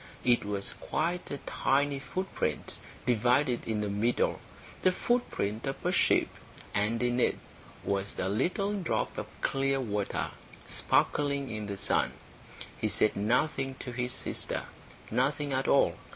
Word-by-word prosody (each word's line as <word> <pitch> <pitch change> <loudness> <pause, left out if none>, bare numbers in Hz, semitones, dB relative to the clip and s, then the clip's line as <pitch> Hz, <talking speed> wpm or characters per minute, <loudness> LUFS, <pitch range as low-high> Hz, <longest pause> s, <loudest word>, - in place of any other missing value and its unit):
It 120 -1 +4
was 100 -1 -2
quite 175 +3 -2
a 140 - -3
tiny 140 +1 +1
footprint, 185 +8 -3 0.3
divided 125 +2 +2
in 110 -2 0
the 105 - -1
middle 105 +4 +1 0.4
the 185 - +5
footprint 135 - 0
of 135 - -4
a - - +3
sheep; - - +4 0.5
and 110 +4 +1
in 120 0 +2
it - - +3 0.5
was 100 0 -1
a 90 - 0
little 180 - +1
drop 190 -5 -1
of - - -4
clear 135 0 +1
water, 105 -5 -1 0.3
sparkling 140 -2 +1
in 110 -1 -4
the 100 -1 -4
sun. - - +1 0.7
He 110 - +1
said 105 +1 +2
nothing 130 +5 +1
to 125 - -6
his 125 +1 -2
sister, - - -2 0.5
nothing 140 +4 +1
at 130 +1 0
all. 140 - +4
125 Hz, 140 wpm, -30 LUFS, 105-140 Hz, 0.7 s, the